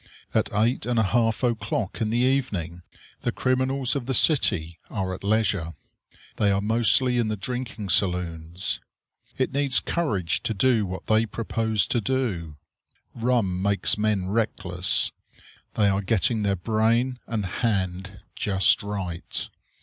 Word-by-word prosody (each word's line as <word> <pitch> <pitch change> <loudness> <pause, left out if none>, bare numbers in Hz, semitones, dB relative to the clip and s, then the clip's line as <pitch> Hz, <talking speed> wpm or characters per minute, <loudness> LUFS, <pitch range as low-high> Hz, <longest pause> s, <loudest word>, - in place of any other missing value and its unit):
At - - +1
eight 115 +5 +1
and 120 -1 0
a 110 - +4
half 115 +3 +1
o'clock 110 -4 -1
in 110 - +1
the 115 - 0
evening 120 -10 0 0.4
the - - 0
criminals 130 0 0
of 130 -3 -3
the 135 - 0
city 85 - +2
are 95 -3 -2
at 95 - -8
leisure. 100 -6 0 0.6
They 105 - +3
are 100 0 +2
mostly 120 +4 +3
in 115 - +1
the 110 - -1
drinking 120 -2 -5
saloons. 90 -1 0 0.6
It 130 - 0
needs 140 -2 +2
courage 105 - -1
to 110 - -2
do 115 -2 +2
what 90 +1 -6
they 110 +1 +2
propose 110 -1 -1
to 120 - 0
do. 100 - -2 0.6
Rum 115 -6 0
makes 100 0 +2
men 105 -3 0
reckless. 95 -3 0 0.6
They 105 - +3
are 100 0 +1
getting 110 +2 +1
their 100 -1 +1
brain 115 +6 +1
and 110 -3 -2
hand 95 -2 -2
just 95 -2 +3
right. 95 -4 -4
110 Hz, 140 wpm, -25 LUFS, 95-120 Hz, 0.6 s, a